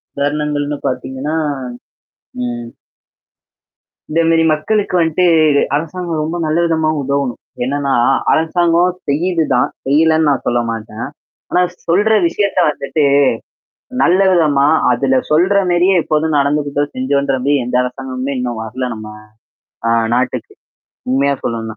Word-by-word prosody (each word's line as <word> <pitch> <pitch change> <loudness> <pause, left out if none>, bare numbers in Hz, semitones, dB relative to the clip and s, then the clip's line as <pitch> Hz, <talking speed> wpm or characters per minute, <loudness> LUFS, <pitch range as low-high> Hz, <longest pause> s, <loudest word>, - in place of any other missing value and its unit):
உதாரணங்கள்னு 145 0 -1
பார்த்தீங்கன்னா. 130 +4 -3 1.1
ம். 120 -1 -5 1.4
இந்த 165 +2 +2
மேரி 165 0 +3
மக்களுக்கு 195 +6 0
வந்துட்டுது 160 -3 +3
அரசாங்கம் 165 +1 -3
ரொம்ப 160 +3 -3
நல்ல 155 +2 0
விதமா 160 -2 +1
உதவணும். 140 -2 -2 0.2
என்னன்னா 140 +1 -1 0.4
அரசாங்கம் 170 +2 +2 0.2
செய்யுது 165 +3 +1
தான். 125 - +2 0.2
செய்யலேன்னு 160 +2 +3
நான் 140 - 0
சொல்ல 120 0 +1
மாட்டேன். 110 0 -5 0.4
ஆனா 180 - +3 0.3
சொல்ற 205 +6 +3
விஷயத்த 200 +2 -1
வந்துட்டு, 150 +1 -2 1.0
நல்ல 180 +2 +3
விதமா. 150 -6 +3 0.3
அதுல 130 +2 +2
சொல்ற 180 +6 +3
மேரியே 175 +2 +3
இப்போதும் 155 0 0
நடந்துக்கிட்டோம் 145 0 0
செஞ்சோன்ற 135 +1 0
மாரி 145 - +3
எந்த 125 +1 -1
அரசாங்கமுமே 130 +1 -4
இன்னும் 120 -2 -3
வரல 125 +3 -4
நம்ம 110 0 -9 0.8
ஆ - - +2 0.3
நாட்டுக்கு. 125 +1 -2 0.6
உண்மையா 140 +2 +2
சொல்லனும்னா 115 -2 -4
145 Hz, 115 wpm, -16 LUFS, 130-165 Hz, 1.4 s, மேரி